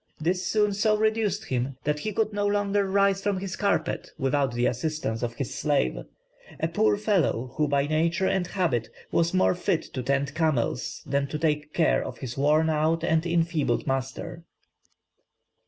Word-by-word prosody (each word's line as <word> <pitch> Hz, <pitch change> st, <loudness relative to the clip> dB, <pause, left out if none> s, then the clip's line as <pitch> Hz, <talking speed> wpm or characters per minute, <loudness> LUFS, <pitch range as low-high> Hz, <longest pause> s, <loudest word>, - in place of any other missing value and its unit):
This 180 Hz, +4 st, 0 dB
soon 210 Hz, -2 st, +2 dB
so 215 Hz, +1 st, +2 dB
reduced 215 Hz, -1 st, 0 dB
him, 130 Hz, -, -2 dB
that 150 Hz, 0 st, 0 dB
he 215 Hz, -, -3 dB
could 215 Hz, +1 st, 0 dB
no 205 Hz, 0 st, 0 dB
longer 205 Hz, -1 st, +1 dB
rise 195 Hz, 0 st, +3 dB
from 200 Hz, -1 st, 0 dB
his 190 Hz, 0 st, -4 dB
carpet 170 Hz, -6 st, -1 dB
without 135 Hz, -1 st, +1 dB
the 120 Hz, +1 st, +1 dB
assistance 125 Hz, -3 st, -2 dB
of 120 Hz, -1 st, -3 dB
his 135 Hz, -1 st, -4 dB
slave, 145 Hz, -, +1 dB, 0.6 s
"a -, -, +1 dB
poor 105 Hz, -1 st, +2 dB
fellow 155 Hz, -, 0 dB
who 150 Hz, -1 st, +2 dB
by 140 Hz, -1 st, +2 dB
nature 165 Hz, +5 st, +1 dB
and 185 Hz, -2 st, +1 dB
habit 135 Hz, -, -1 dB, 0.2 s
was 170 Hz, 0 st, +2 dB
more 185 Hz, 0 st, +3 dB
fit 175 Hz, -2 st, 0 dB
to 130 Hz, -, -2 dB
tend 140 Hz, +2 st, 0 dB
camels 140 Hz, -6 st, -1 dB
than 140 Hz, 0 st, 0 dB
to 150 Hz, -, -4 dB
take 150 Hz, -1 st, -1 dB
care 165 Hz, -, +3 dB
of -, -, -7 dB
his 125 Hz, -3 st, -6 dB
worn 150 Hz, +3 st, +3 dB
out 160 Hz, +1 st, +1 dB
and 160 Hz, 0 st, +1 dB
enfeebled 165 Hz, -7 st, +1 dB
master." 135 Hz, +5 st, -3 dB
160 Hz, 170 wpm, -26 LUFS, 140-190 Hz, 0.6 s, rise